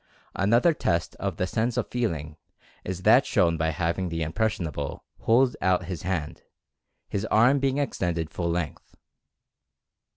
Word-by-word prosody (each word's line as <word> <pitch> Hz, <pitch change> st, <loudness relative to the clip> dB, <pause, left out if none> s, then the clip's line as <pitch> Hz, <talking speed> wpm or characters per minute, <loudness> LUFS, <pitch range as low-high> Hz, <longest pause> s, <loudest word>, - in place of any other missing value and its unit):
Another 115 Hz, -, +3 dB
test 85 Hz, -, -1 dB
of -, -, -3 dB
the 90 Hz, -, 0 dB
sense 110 Hz, +5 st, -1 dB
of -, -, 0 dB
feeling 80 Hz, -11 st, -2 dB, 0.5 s
is 95 Hz, 0 st, -5 dB
that -, -, +6 dB
shown 85 Hz, -1 st, +2 dB
by 80 Hz, 0 st, 0 dB
having 85 Hz, +2 st, -1 dB
the 85 Hz, -1 st, -2 dB
"impressionable" 80 Hz, -5 st, -2 dB
hold 125 Hz, +2 st, +3 dB
out 90 Hz, -1 st, +2 dB
his 90 Hz, -1 st, -5 dB
hand, 85 Hz, -5 st, -3 dB, 0.7 s
his 100 Hz, -, -3 dB
arm 120 Hz, +6 st, +4 dB
being 135 Hz, 0 st, 0 dB
extended 85 Hz, -, -1 dB
full 85 Hz, +1 st, -2 dB
length. 85 Hz, -3 st, -4 dB
90 Hz, 140 wpm, -26 LUFS, 85-110 Hz, 0.7 s, that